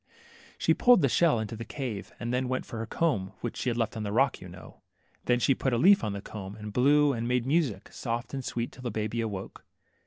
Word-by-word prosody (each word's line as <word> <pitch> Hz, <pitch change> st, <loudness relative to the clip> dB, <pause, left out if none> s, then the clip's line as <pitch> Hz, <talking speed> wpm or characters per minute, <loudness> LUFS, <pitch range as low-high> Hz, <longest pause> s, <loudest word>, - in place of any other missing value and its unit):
She -, -, +3 dB
pulled 245 Hz, -8 st, +5 dB
the -, -, +5 dB
shell 150 Hz, -1 st, +3 dB
into 110 Hz, 0 st, -4 dB
this 115 Hz, 0 st, -7 dB
cave, 115 Hz, -4 st, -5 dB
and 120 Hz, +1 st, -3 dB
then 125 Hz, +1 st, 0 dB
went 130 Hz, -, -2 dB
for 115 Hz, -, -7 dB
her 115 Hz, -, -4 dB
comb 110 Hz, -, 0 dB
which 120 Hz, -, -4 dB
she 130 Hz, -, -1 dB
had 120 Hz, -, -2 dB
left 115 Hz, 0 st, -1 dB
on 110 Hz, -, -4 dB
the 105 Hz, -1 st, -3 dB
rock, 135 Hz, +4 st, +2 dB
you 90 Hz, -, -9 dB
know. 90 Hz, +2 st, -13 dB, 0.4 s
Then 125 Hz, -, +3 dB
she 135 Hz, -, +3 dB
put 130 Hz, 0 st, -1 dB
a -, -, +2 dB
leaf 190 Hz, +7 st, +6 dB
on 105 Hz, -2 st, -1 dB
the 100 Hz, -, -5 dB
comb, 100 Hz, -2 st, -7 dB
and 105 Hz, -1 st, -8 dB
blew, 145 Hz, +3 st, +4 dB
and 115 Hz, -1 st, -3 dB
made 125 Hz, -1 st, +1 dB
music, 135 Hz, -, 0 dB
soft 120 Hz, +1 st, -4 dB
and 135 Hz, -1 st, -3 dB
sweet, 120 Hz, -1 st, -3 dB
till -, -, -13 dB
the 125 Hz, -, -3 dB
baby 110 Hz, +1 st, -2 dB
awoke. 100 Hz, -4 st, -5 dB
120 Hz, 250 wpm, -28 LUFS, 110-130 Hz, 0.4 s, leaf